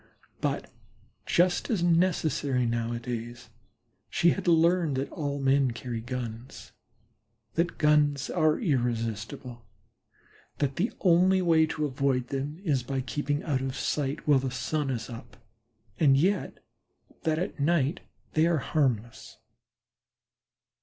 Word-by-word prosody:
But, - - -2 0.6
just 175 +1 +2
as 205 -7 0
necessary 160 -7 +2
nowadays, 120 0 -4 0.6
she 170 - +3
had 195 -2 -4
learned 170 -2 +3
that 135 +1 -3
all 145 -2 -3
men 135 0 +3
carry 115 -1 -5
guns, 120 0 -7 0.8
that 170 +1 0
guns 150 -2 +3
are 155 -1 +2
irresistible, 120 - -2 0.9
that 140 -2 -1
the 205 +8 0
only 185 +1 +4
way 160 -2 +4
to 155 -1 -2
avoid 130 -2 0
them 140 +2 -3
is 145 -8 +1
by 135 +2 -3
keeping 145 +4 -2
out 135 -4 -1
of 135 0 -3
sight 150 +2 -2
while 145 -3 +5
the 130 0 -2
sun 135 +4 -2
is 115 -3 -3
up, 115 -1 -10 0.6
and 135 -4 +5
yet 190 +8 0 0.6
that 160 -2 0
at 175 -2 -3
night 150 -1 +1 0.3
they 160 +1 +3
are 170 -1 +2
harmless. 125 -6 -1
140 Hz, 125 wpm, -28 LUFS, 125-160 Hz, 0.9 s, while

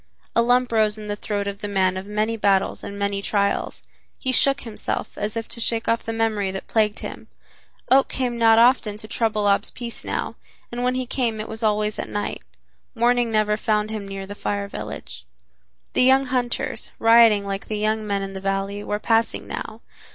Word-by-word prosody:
A 230 - +5
lump 245 +1 +3
rose 215 -1 +2
in 215 - -8
the 205 0 -3
throat 205 -1 -3
of 200 0 -4
the 205 - -3
man 190 -2 +1
of 190 +1 -5
many 215 +2 0
battles 200 -3 +1
and 200 - -6
many 200 0 -1
trials. 200 0 -1 0.3
He 260 - -1
shook 275 +2 +4
himself, 225 -3 -4
as 210 +2 -3
if 225 - -3
to 230 - -2
shake 225 0 0
off 230 0 +2
the 225 - -4
memory 220 -3 0
that 190 0 -5
plagued 215 -2 +1
him. - - -7 0.6
Oak 270 +1 +6
came 250 -2 -1
not 225 -1 +5
often 230 -3 +4
to 215 - -9
trouble 215 -2 0
Ab's 200 0 +3
peace 235 -2 -7
now, - - -3 0.3
and 240 0 -4
when 250 0 +1
he 255 0 -1
came 235 -3 -1
it 215 - -4
was 220 +1 -5
always 210 -1 +1
at - - -4
night. 205 - -3 0.5
Morning 240 0 +2
never 210 -1 +2
found 215 -1 0
him 210 -2 -5
near 195 0 -6
the 200 - -7
Fire 200 0 -3
Village. - - -7 0.7
The - - +2
young 265 +2 +5
hunters, 250 -2 -2
rioting 225 -3 +6
like 195 0 -4
the 215 - -3
young 215 0 0
men 200 -1 -1
in 195 0 -6
the 190 - -6
valley, 195 +1 -2
were 210 - -2
passing 225 +1 +1
now. - - -6
215 Hz, 205 wpm, -23 LUFS, 205-230 Hz, 0.7 s, Oak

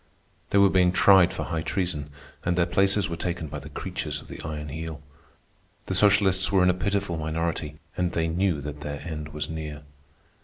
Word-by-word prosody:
They - - +2
were 100 -1 +6
being 90 -1 +4
tried 95 -1 +6
for - - -4
high 80 -2 -2
treason, 85 -5 -2 0.3
and 85 0 0
their 85 - +4
places 100 +2 +2
were 85 - -4
taken 85 -1 -3
by 75 - -6
the - - -10
creatures - - -4
of - - -15
the - - -8
Iron 75 -1 -5
Heel. 80 +1 -5 0.9
The - - -3
socialists 95 -1 +4
were 95 -2 +4
in 90 - +5
a - - -1
pitiful 100 -1 -1
minority, 80 -1 -2 0.2
and 90 -1 0
they 80 -1 +1
knew 85 -2 0
that 75 +1 -7
their 75 -1 -5
end 75 -3 -6
was 75 -1 -4
near. 75 -2 -6
85 Hz, 195 wpm, -26 LUFS, 75-95 Hz, 0.9 s, were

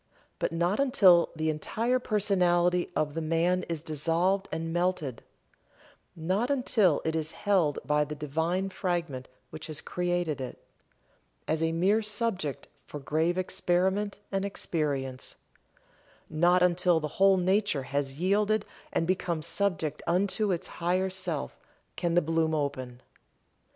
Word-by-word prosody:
But - - 0
not 175 +6 0
until 190 -11 +5
the 160 0 0
entire 230 +11 -1
personality 180 -5 +2
of 150 -1 0
the 165 - -3
man 165 +3 +1
is 165 -2 -3
dissolved 170 +6 0
and 165 0 -3
melted 175 -8 -1 0.9
not 185 - -1
until 225 - +2
it 160 0 0
is 155 -1 -2
held 180 -8 +1
by 150 0 +2
the 150 +1 -6
divine 160 +6 -1
fragment 170 -9 -2 0.2
which 155 +1 -7
has 155 -1 -5
created 175 -5 -2
it, 130 - -6 0.9
as 160 0 0
a 165 0 +1
mere 190 +7 +2
subject 210 - -3 0.2
for 145 - -7
grave 160 +5 0
experiment 190 +2 0
and 195 0 0
experience 145 -9 -2 1.0
not 175 +3 +4
until 180 -1 +3
the 150 - -3
whole 195 -1 +6
nature 190 -4 +1
has 140 +1 -3
yielded 205 +3 +2 0.3
and 165 - 0
become 175 -3 -1
subject 175 -7 -1
unto 195 +4 +1
its 175 - -2
higher 185 +2 -1
self, 185 -5 -4 0.4
can 170 -1 -1
the 175 - +4
bloom 160 0 +1
open. 130 -4 -3
175 Hz, 135 wpm, -28 LUFS, 155-190 Hz, 1.0 s, whole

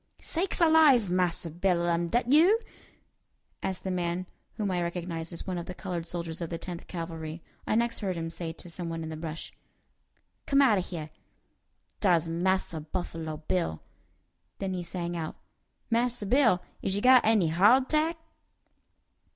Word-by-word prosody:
"Sakes 355 +4 -1
alive! 310 - +6
Massa 175 -2 0
Bill, 175 0 +1
am 170 0 +1
dat 240 +7 0
you?" 340 +9 +6 1.0
asked 190 -1 -3
the 190 - -2
man, 175 0 -1 0.3
whom 210 -3 -2
I 180 -1 0
recognized 170 -1 -4
as 170 - -5
one 185 -2 -2
of 170 - -7
the 180 - -6
colored 175 -4 -4
soldiers 170 -1 -4
of 170 - -3
the 165 - -3
Tenth 175 0 -7
Cavalry. 165 -2 -6 0.2
I - - +1
next 235 +1 +1
heard 190 -4 -2
him 165 0 -4
say 170 -1 -5
to 165 - -11
some 170 0 -5
one 165 0 -4
in 160 - -5
the 160 - -5
brush: 155 0 -6 0.9
"Come 275 -2 +4
out 235 -8 +5
o' - - +1
heah. 160 -4 -6 0.9
Dar's 175 -5 +3
Massa 175 0 0
Buffalo 160 -1 -4
Bill." 170 - -1 0.7
Then 195 -1 -3
he 180 - -2
sang 175 0 -4
out, 160 -2 -4 0.6
"Massa 235 -1 +1
Bill, 225 -5 +4 0.2
is 190 - -1
you 205 - -2
got 255 -1 +7
any 215 -7 +3
hawdtack?" 265 - +4
180 Hz, 165 wpm, -29 LUFS, 170-215 Hz, 1.0 s, got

